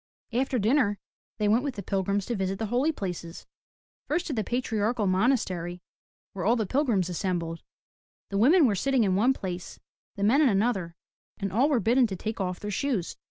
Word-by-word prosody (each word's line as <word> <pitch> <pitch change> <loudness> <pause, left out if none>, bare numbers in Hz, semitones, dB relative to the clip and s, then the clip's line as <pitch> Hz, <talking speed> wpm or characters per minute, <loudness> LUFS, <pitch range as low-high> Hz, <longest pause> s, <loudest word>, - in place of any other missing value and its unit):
After 260 +2 +1
dinner 220 -1 +2 0.4
they 210 - +1
went 225 +5 +3
with 280 -3 -3
the 200 - -6
pilgrims 195 +1 -1
to 240 - -2
visit 195 -1 -2
the 220 - -2
Holy 270 +6 +2
Places, 180 - -6 0.3
— - - -69
first 335 +4 0
to 305 - -3
the 220 -4 -1
Patriarchal 225 -2 -1
Monastery 185 -4 0 0.5
where 190 - -4
all 230 +6 +3
the 220 -3 0
pilgrims 225 - +1
assembled. 170 -2 -3 0.7
The 200 - 0
women 305 - +6
were 225 - +3
sitting 260 +5 +2
in 190 -3 +2
one 240 +7 +4
place, 180 -7 -6 0.4
the 200 - -3
men 245 +9 +4
in 285 - +5
another 195 -5 0 0.4
and 195 -2 -3
all 260 +8 +3
were 275 -5 +3
bidden 240 +4 +3
to 195 - -4
take 215 +3 -4
off 180 -1 -2
their 210 - -5
shoes. 215 -5 -1
210 Hz, 195 wpm, -27 LUFS, 190-250 Hz, 0.7 s, women